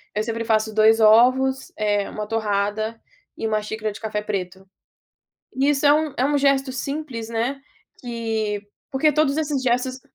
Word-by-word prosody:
Eu 210 - +1
sempre 230 0 -3
faço 220 -1 +1
2 220 +1 +5
ovos, 255 +5 +4
eh, 205 -1 0
1 210 0 -5
torrada 215 +1 -1 0.4
e 225 - -2
1 215 -1 0
xícara 215 0 -4
de 210 - -10
café 215 -2 -3
preto. 190 -2 -5 0.9
Isso 280 +2 +2
é 285 - +7
um 310 -1 0
é 255 - +2
um 290 +1 +1
gesto 275 -1 +2
simples, 265 -3 -5
né, 240 +5 -2 0.4
que 225 -4 -3 0.3
porque 300 +2 +2
todos 290 -1 +2
esses 295 -4 -1
gestos 255 +1 0
230 Hz, 160 wpm, -22 LUFS, 215-270 Hz, 0.9 s, é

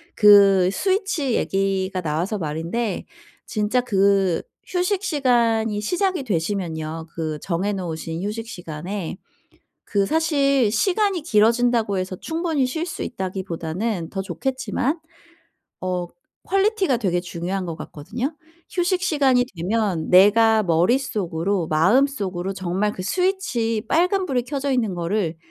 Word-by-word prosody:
그 200 -3 +7
스위치 375 - 0
얘기가 190 -1 0
나와서 170 +6 -1
말인데 170 +8 -3 0.4
진짜 215 +3 0
그 195 -6 +2 0.3
휴식시간이 255 - +1
시작이 360 - 0
되시면요. 165 -5 -2
그 155 -2 -3
정해 190 +5 -1
놓으신 165 -2 -4
휴식시간에 195 -5 -5 0.7
그 200 -1 +1
사실 280 -4 +2
시간이 380 - +1
길어진다고 230 - +2
해서 185 0 -2
충분히 320 - -1
쉴 320 +6 -3
수 350 - -5
있다기보다는 185 -1 -3
더 195 - -3
좋겠지만 260 - -2 0.8
어 180 -1 -2 0.4
quality가 390 - +2
되게 185 -6 0
중요한 180 +2 -4
것 165 -2 -4
같거든요. 225 - -5 0.4
휴식 360 0 0
시간이 280 -8 +3
되면 185 -2 -1
내가 215 +4 +6
머릿속으로 185 -2 0
마음속으로 190 - +1
정말 190 +3 -1
"그 185 - -6
스위치 240 - 0
빨간 370 +3 +2
불이 255 -6 0
켜져 280 +1 -2
있는 230 -7 +1
거를 175 -1 -1
210 Hz, 285 characters per minute, -22 LUFS, 180-270 Hz, 0.8 s, 그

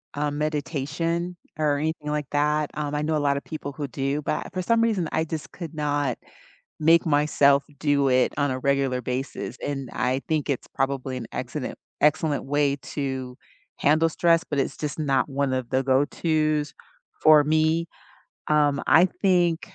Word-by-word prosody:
um, 145 0 -1
meditation, 155 +4 -2 0.2
or 150 -2 +1
anything 155 0 -3
like 150 -2 -2
that, 150 +1 +1
um, 150 -1 -3
I 150 - 0
know 155 +1 0
a - - +2
lotta 140 -1 +1
people 145 -2 -7
who 140 +1 -5
do, 135 +3 -2
but - - -1
I - - -8
for 185 - -3
some 230 +5 +2
reason, 215 -7 +1
I 160 - +2
just 160 -1 -6
could 170 -3 -7
not 145 -4 -1 0.6
make 165 +2 +5
myself 145 -2 +3 0.2
do 145 -2 +2
it 130 0 +3
on 145 -2 +1
a 130 - -4
regular 135 -2 +1
basis, 130 +3 -4
and 135 -3 -4
I 130 +2 0
think 155 -3 0
it's 140 -3 -2
probably 135 -1 -2
an 120 -2 -5
excellent 130 +2 -4 0.2
excellent 150 -2 +2
way 145 0 +1
to 130 -3 -5 0.4
handle 155 +3 +3
stress, 170 +1 +2
but 145 -2 -1
it's - - -2
just 150 -1 -4
not 140 -2 +1
one 140 -1 -1
of 130 -2 -2
the 130 0 +2
go-to's 150 +3 +1 0.5
for 155 -1 +7
me, 155 +2 +2 0.6
Um, 145 -2 +2
I 160 +6 +7
think 175 -3 +1
145 Hz, 170 wpm, -25 LUFS, 140-155 Hz, 0.6 s, for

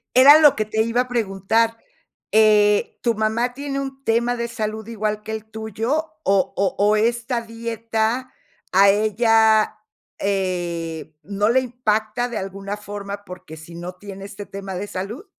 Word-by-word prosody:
Era 280 +4 +9
lo 300 -3 +6
que 215 - -1
te 220 +1 0
iba 230 +2 +1
a 250 - -4
preguntar. 225 0 0 0.5
Eh, 210 -1 +4
¿tu 235 - +2
mamá 220 +3 0
tiene 275 +1 -4
un 270 0 -6
tema 235 +1 +1
de 235 0 -3
salud 220 -2 -4
igual 215 -2 -3
que 220 - -6
el 220 -1 -5
tuyo, 220 +9 -3
o 195 -5 +2
o 195 0 0
o 205 +2 +3
esta 235 +2 0
dieta, 230 +1 -3 0.4
a 195 +2 +6
ella, 220 +1 +3 0.4
eh, 175 -5 -2
no 205 +2 0
le 260 +2 +4
impacta 240 -1 -1
de 235 - -4
alguna 195 +1 -5
forma, 205 -1 -7
porque 180 -3 -10
sí 160 +2 -12
no 175 +2 -6
tiene 195 0 -9
este 205 0 -8
tema 195 0 -7
de 200 +3 -4
salud? 210 - -6
215 Hz, 160 wpm, -22 LUFS, 200-235 Hz, 0.5 s, Era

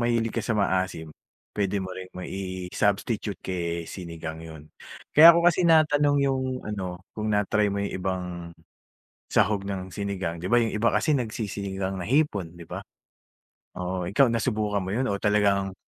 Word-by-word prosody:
mahilig 115 -1 +1
ka - - -1
sa 110 - -1
maasim, 95 -5 -1 0.4
pwede 100 -1 -1
mo 95 - -6
ring 95 0 -8
mai-substitute 95 +3 -2
kay 85 -2 -3
sinigang 80 -3 -7
yun. 80 -2 -10 0.5
Kaya 165 +2 +10
ko 170 - +2
kasi 175 0 +4
natanong 150 -2 +4
yung 135 -1 +1 0.2
ano, 95 -3 -5
kung 110 0 -3
na-try 105 0 +2
mo 100 0 -1
yung - - -4
ibang 95 0 -2 1.1
sahog 100 -1 +2
ng 95 -2 -5
sinigang, 95 -5 -3
'di 90 - -3
ba 120 - +5
yung 115 -2 0
iba 115 +2 +2
kasi 155 - +2
nagsi-sinigang 100 -5 -3
na - - -4
hipon, 105 - 0
'di 85 - -10
ba? - - -6 0.9
Oo, 90 -1 -3
ikaw 125 +8 +4
nasubukan 110 -3 0
mo 95 - -5
yun 130 - +1
o 100 -4 -1
talagang 100 -2 +2
100 Hz, 160 wpm, -26 LUFS, 90-110 Hz, 1.1 s, Kaya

